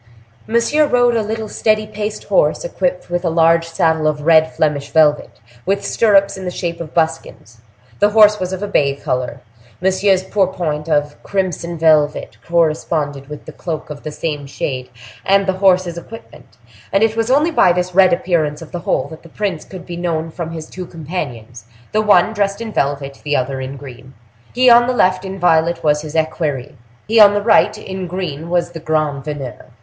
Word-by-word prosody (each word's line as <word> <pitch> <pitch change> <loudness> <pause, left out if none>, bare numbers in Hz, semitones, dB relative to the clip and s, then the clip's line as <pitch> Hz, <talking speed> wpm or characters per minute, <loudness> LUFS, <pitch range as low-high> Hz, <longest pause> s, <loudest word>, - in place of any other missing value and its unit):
Monsieur 235 +7 +2
rode 245 -2 +3
a 225 - +2
little 220 +1 -4
steady 215 0 0
paced 215 0 -5
horse, 165 -7 +1
equipped 180 0 -2
with 175 +1 -1
a 170 - +1
large 165 0 +3
saddle 160 -1 +1
of 150 -1 -1
red 160 -1 +5
Flemish 150 -3 -1
velvet, 150 -2 +2 0.2
with 195 +1 -1
stirrups 200 -3 +3
in 190 - -8
the 180 - -3
shape 170 -1 -4
of 160 -2 -7
buskins; 160 -8 -3 0.4
the 205 - +4
horse 210 0 +5
was 185 0 -3
of 190 +1 -4
a - - -2
bay 140 -8 +1
color; 125 -2 -3 0.4
Monsieur's 190 0 +2
pourpoint 175 -6 -1
of 145 -1 0
crimson 175 -3 -3
velvet 155 -2 +2
corresponded 155 -4 -1
with 150 - -9
the - - -9
cloak 160 -3 -6
of 145 - -8
the - - -6
same 150 -2 -4
shade 130 -2 -4 0.3
and 195 0 +3
the 190 - +1
horse's 185 -2 +2
equipment, 200 - -14 0.3
and 195 - +2
it 225 0 +1
was 225 +1 -1
only 295 +6 +3
by 185 - +4
this 180 +1 -1
red 185 0 +5
appearance 165 -4 0
of 155 - -14
the 175 - -4
whole - - -1
that 160 - -11
the 165 - -15
prince 195 -3 -3
could 185 -2 -11
be 175 -1 -7
known 165 -2 -2
from 170 0 -5
his 160 -1 -7
two 180 -1 -8
companions, 125 - -7 0.3
the 215 - +2
one 205 -1 +4
dressed 200 -1 -1
in 225 -2 -6
violet, 140 0 -2
the 150 -1 -1
other 130 0 -2
in 130 +1 -6
green. 130 -1 -12 0.4
He 255 +1 +2
on 240 0 +7
the 255 - +1
left, 185 -5 +2
in 190 0 -6
violet, 170 -1 +2
was 150 -1 +2
his 155 0 -8
equerry; 155 -3 -2 0.3
he 225 +2 +3
on 205 -1 +8
the 205 - 0
right, 215 -1 +3
in 190 -3 -6
green, 170 -3 -5
was 175 -1 0
the 165 - -8
grand 155 -3 -1
veneur. 135 -7 -6
170 Hz, 195 wpm, -17 LUFS, 150-195 Hz, 0.4 s, on